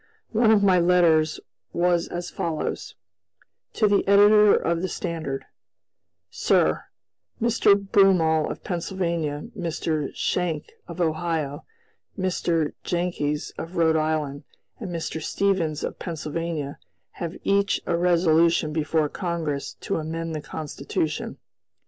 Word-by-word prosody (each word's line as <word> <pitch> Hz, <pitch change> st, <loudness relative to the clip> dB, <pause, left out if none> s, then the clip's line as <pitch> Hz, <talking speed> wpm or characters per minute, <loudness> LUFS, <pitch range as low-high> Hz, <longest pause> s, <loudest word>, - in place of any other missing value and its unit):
One 225 Hz, 0 st, +3 dB
of 215 Hz, -2 st, +5 dB
my 185 Hz, -2 st, +5 dB
letters 170 Hz, -3 st, +3 dB, 0.3 s
was 175 Hz, -1 st, +2 dB
as 175 Hz, 0 st, -5 dB
follows: 160 Hz, -2 st, -3 dB, 0.8 s
"To 215 Hz, -, +3 dB
the 205 Hz, -1 st, +3 dB
Editor 205 Hz, +1 st, +7 dB
of 170 Hz, 0 st, 0 dB
the 185 Hz, -, -1 dB
Standard: 160 Hz, -7 st, -4 dB, 0.9 s
"Sir: -, -, +2 dB, 0.5 s
Mr. 230 Hz, -3 st, +4 dB
Broomall 190 Hz, -6 st, +3 dB
of -, -, -7 dB
Pennsylvania, 170 Hz, -4 st, -2 dB
Mr. 165 Hz, -5 st, -2 dB
Schenck 165 Hz, -4 st, -1 dB, 0.2 s
of 170 Hz, +1 st, -8 dB
Ohio, 160 Hz, -3 st, -1 dB, 0.5 s
Mr. 170 Hz, -4 st, 0 dB
Jenckes 170 Hz, -4 st, -2 dB
of 170 Hz, +3 st, -7 dB
Rhode 160 Hz, -1 st, +3 dB
Island, 155 Hz, -3 st, -1 dB, 0.4 s
and 210 Hz, -6 st, -5 dB
Mr. 165 Hz, -2 st, -4 dB
Stevens 170 Hz, -4 st, 0 dB
of -, -, -4 dB
Pennsylvania, 160 Hz, -2 st, -4 dB, 0.4 s
have 170 Hz, 0 st, -4 dB
each 200 Hz, 0 st, +2 dB
a 170 Hz, -, 0 dB
resolution 170 Hz, -2 st, +3 dB
before 155 Hz, 0 st, +1 dB
Congress 160 Hz, -5 st, -3 dB
to -, -, -2 dB
amend 165 Hz, +1 st, -4 dB
the 155 Hz, -, -4 dB
Constitution. 150 Hz, +1 st, -4 dB
170 Hz, 115 wpm, -24 LUFS, 155-180 Hz, 0.9 s, Editor